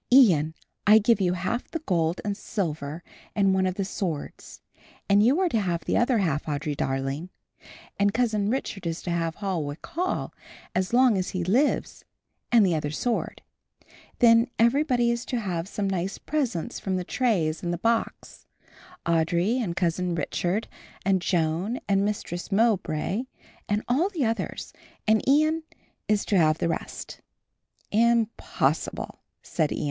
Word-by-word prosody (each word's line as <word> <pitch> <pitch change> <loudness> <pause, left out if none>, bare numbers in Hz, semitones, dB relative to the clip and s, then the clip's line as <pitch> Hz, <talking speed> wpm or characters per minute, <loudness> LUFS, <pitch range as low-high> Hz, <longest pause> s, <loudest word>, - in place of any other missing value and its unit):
"Ian, 170 - +5 0.3
I 210 +1 +9
give 220 0 +3
you 180 -1 +2
half 185 +7 -3
the - - -3
gold 175 - 0
and 205 -1 -1
silver 160 -6 -4 0.3
and 195 -2 +3
one 190 0 +2
of 185 - -2
the 195 - -2
swords, 175 -6 -5 0.5
and 200 +1 +5
you 265 +9 +4
are 375 -2 +2
to 230 - +1
have 175 -5 -2
the - - 0
other 240 0 +3
half, 160 -8 0
Audry 145 0 -2
darling, 135 +6 -2 0.7
and 200 0 +3
Cousin 215 -3 +1
Richard 210 -7 -3
is 165 0 -4
to 175 - -3
have 165 -1 -1
Holwick 170 -7 -3
Hall 355 +3 -2 0.4
as 185 0 0
long 245 -4 +4
as 185 - -2
he 185 -2 -2
lives 245 - +1 0.5
and 230 -4 +6
the 180 - +2
other 150 -2 -1
sword. 230 +10 -2 0.7
Then 230 0 +6
everybody 240 0 +3
is 235 0 -2
to 245 - -2
have 180 -5 -3
some 200 0 -2
nice 190 0 -2
presents 260 - -2
from 190 -1 -2
the 180 - -1
trays 175 -9 0
and 175 - -2
the 175 - -1
box, 230 +5 -2 0.6
Audry 170 +7 +2
and 200 -9 -2
Cousin 175 0 0
Richard, 175 +6 -1 0.4
and 195 -2 +3
Joan 175 +7 0
and 195 -1 +2
Mistress 200 -3 -3
Mowbray 200 -1 +1 0.4
and 210 +1 0
all 295 +11 +2
the 330 -10 -1
others, 225 0 -3 0.3
and 220 0 +4
Ian 310 +3 +3 0.5
is 210 -1 +1
to 195 - +2
have 155 -1 +4
the 170 - 0
rest." 165 - -5 0.7
"Impossible," 230 +1 0 0.2
said 155 -4 -1
Ian. - - -2
195 Hz, 155 wpm, -26 LUFS, 170-235 Hz, 0.7 s, I